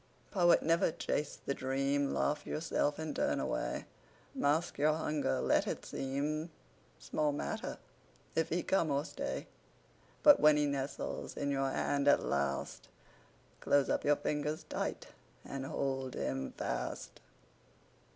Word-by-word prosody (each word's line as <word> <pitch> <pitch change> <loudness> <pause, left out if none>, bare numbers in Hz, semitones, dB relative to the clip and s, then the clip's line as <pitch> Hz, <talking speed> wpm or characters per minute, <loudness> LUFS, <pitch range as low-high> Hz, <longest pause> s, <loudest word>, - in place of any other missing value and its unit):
Poet, 175 -4 +5
never 165 +2 +3
chase 150 -1 -2
the 140 - 0
dream. 135 +2 0
Laugh 150 - 0
yourself 150 -2 0
and 160 -1 -4
turn - - +1
away. - - -2 0.5
Mask 150 +4 +1
your 150 +2 +4
hunger; 150 - 0
let - - +2
it - - -3
seem 150 +4 -2 0.5
Small 150 -1 0
matter 145 - -3 0.6
if 160 0 +1
he 175 +2 0
come 170 -5 +2
or 140 +1 +1
stay; - - -4 0.8
But 290 -1 +9
when 150 0 +6
he 150 - +3
nestles 140 -1 -3
in 140 0 -1
your 135 -1 +1
hand 140 +1 0
at 145 - +5
last, 70 +1 -1 0.7
Close 140 -1 +3
up - - +1
your 145 - +4
fingers 150 +1 -2
tight - - -3 0.4
and 135 -1 -5
hold 135 -3 -2
him 65 0 -2
fast. 60 0 -4
145 Hz, 135 wpm, -34 LUFS, 135-155 Hz, 0.8 s, But